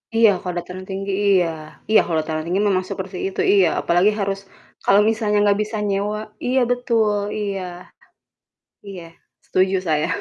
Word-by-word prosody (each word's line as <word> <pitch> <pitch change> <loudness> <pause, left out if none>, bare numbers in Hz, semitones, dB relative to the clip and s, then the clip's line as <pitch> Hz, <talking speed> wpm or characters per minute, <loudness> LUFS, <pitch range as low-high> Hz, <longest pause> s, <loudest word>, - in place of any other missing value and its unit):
Iya, 225 -1 +6
kalau 180 -2 -4
dataran 180 +2 -6
tinggi, 195 +1 -4 0.2
iya 185 -3 +4 0.4
iya, 220 - +6
kalau 165 -2 -2
dataran 155 0 -4
tinggi 185 +4 0
memang 185 -1 0
seperti 190 -1 -5
itu, 195 - -7
iya. 195 -3 +5
Apalagi 175 +4 +3
harus 195 -1 -1 0.5
kalau 200 +1 +5
misalnya 215 -2 0
gak 200 0 +2
bisa 215 +1 -5
nyewa 200 +1 -1 0.3
iya 255 +2 +2
betul, 230 -3 +1 0.3
iya, 200 -2 -3 1.3
iya. 190 -3 -8 0.4
Setuju 185 +1 +1
saya. 155 0 +1
195 Hz, 155 wpm, -21 LUFS, 185-210 Hz, 1.3 s, Iya